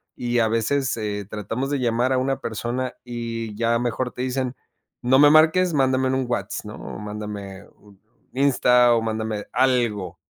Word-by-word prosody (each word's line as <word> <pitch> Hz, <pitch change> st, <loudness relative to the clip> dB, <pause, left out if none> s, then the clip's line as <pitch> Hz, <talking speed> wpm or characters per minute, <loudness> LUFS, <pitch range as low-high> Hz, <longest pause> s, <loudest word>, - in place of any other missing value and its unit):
y 120 Hz, 0 st, -2 dB
a 115 Hz, -, +3 dB
veces, 130 Hz, +4 st, 0 dB
eh, 105 Hz, -2 st, -3 dB
tratamos 115 Hz, +6 st, -4 dB
de 145 Hz, -, 0 dB
llamar 120 Hz, +1 st, +1 dB
a 130 Hz, -, +2 dB
una 135 Hz, +1 st, -1 dB
persona 120 Hz, +3 st, -3 dB
y 115 Hz, -3 st, -5 dB
ya 115 Hz, +1 st, +1 dB
mejor 125 Hz, +1 st, -2 dB
te -, -, -7 dB
dicen: 130 Hz, 0 st, -2 dB, 0.5 s
"No 130 Hz, +2 st, +4 dB
me 145 Hz, 0 st, +8 dB
marques, 160 Hz, +3 st, +5 dB
mándame 130 Hz, -2 st, +2 dB
en -, -, 0 dB
un 130 Hz, -1 st, 0 dB
Whats", 120 Hz, 0 st, -3 dB
¿no?, -, -, -8 dB
o -, -, -8 dB
mándame 105 Hz, -2 st, -7 dB
un 100 Hz, -2 st, -21 dB, 0.4 s
Insta 125 Hz, -3 st, +4 dB
o 115 Hz, -, +1 dB
mándame 110 Hz, -1 st, -3 dB
algo. 120 Hz, -8 st, +1 dB
120 Hz, 175 wpm, -23 LUFS, 110-130 Hz, 0.5 s, me